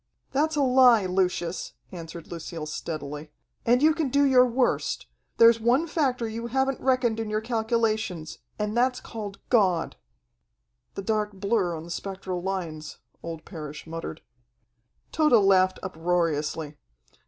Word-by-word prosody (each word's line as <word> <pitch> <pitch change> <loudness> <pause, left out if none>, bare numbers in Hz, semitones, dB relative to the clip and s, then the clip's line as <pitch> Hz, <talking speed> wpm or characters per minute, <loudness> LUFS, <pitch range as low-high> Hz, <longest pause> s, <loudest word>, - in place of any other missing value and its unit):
"That's 310 +3 +1
a 290 - +2
lie, 250 -5 +6
Lucius," 180 -1 -1 0.2
answered 165 -2 -8
Lucille 165 -1 -6
steadily. 150 -1 -6 0.4
"And 245 +4 +4
you 315 +1 +6
can 310 -4 -1
do 285 +3 +3
your 255 -2 +6
worst. 245 +1 0 0.3
There's 230 0 +7
one 245 +8 +3
factor 265 -7 0
you 230 +1 -5
haven't 265 +2 0
reckoned 255 -4 +1
in 220 -1 -3
your 215 0 0
calculations, 220 -7 -1 0.2
and 210 +1 -2
that's 250 +1 +2
called 205 -3 -7
God." 190 -8 +2 1.0
"The 195 - -5
dark 210 0 -1
blur 195 -3 0
on 160 - -7
the 170 - -9
spectral 190 -1 -4
lines," 170 -5 -4 0.2
old 165 -1 -7
Parrish 150 -4 -8
muttered. 165 -1 -6 0.9
Tode 305 -4 +2
laughed 190 -4 +5
uproariously. 160 -4 -1
210 Hz, 135 wpm, -26 LUFS, 170-245 Hz, 1.0 s, There's